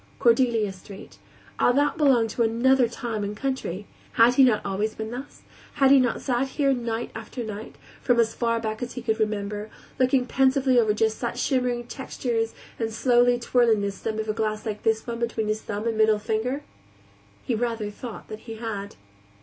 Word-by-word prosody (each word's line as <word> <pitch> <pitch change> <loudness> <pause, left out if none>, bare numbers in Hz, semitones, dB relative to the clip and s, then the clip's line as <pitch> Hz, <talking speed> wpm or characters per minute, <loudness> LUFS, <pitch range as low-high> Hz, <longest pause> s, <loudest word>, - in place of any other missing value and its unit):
Cordelia 230 -4 +3
Street 195 +1 -13 0.4
Ah, - - +5
that 285 +2 +2
belonged 260 -8 +3
to 235 - -2
another 240 +3 +3
time 230 -2 -4
and 205 +1 -4
country; 260 -8 -3 0.3
had 230 +2 +5
he 270 - +6
not 240 -5 +3
always 205 +2 -1
been 220 0 -5
thus, 255 +4 -8 0.3
had 270 -1 +4
he 275 - +8
not 250 -2 0
sat 255 0 0
here 275 0 +1
night 235 -2 -3
after 225 +3 -6
night, 215 0 -7 0.3
from 245 -2 +2
as 225 -1 +2
far 230 -1 0
back 220 0 -4
as 245 0 -4
he 250 - -6
could 220 -1 0
remember, 210 0 -2 0.3
looking 255 0 +3
pensively 260 0 +3
over 220 -2 +3
just 220 0 +1
such 240 0 -3
shimmering 250 -2 0
textures 235 -3 -3 0.2
and 225 -1 -1
slowly 245 +1 +3
twirling 235 -3 +2
the 200 0 -1
stem 215 +2 -4
of 220 0 -3
a 215 - 0
glass 215 0 -2
like 210 -2 -4
this 220 -1 +1
one 235 -1 -4
between 230 -2 -1
his 215 0 -1
thumb 205 +1 -5
and 225 -1 -1
middle 220 -1 +5
finger? 225 +7 -2 0.8
He 250 - -1
rather 225 -2 -2
thought 230 +1 -8
he 220 +1 -7
had. 215 -3 -5
230 Hz, 190 wpm, -25 LUFS, 215-250 Hz, 0.8 s, he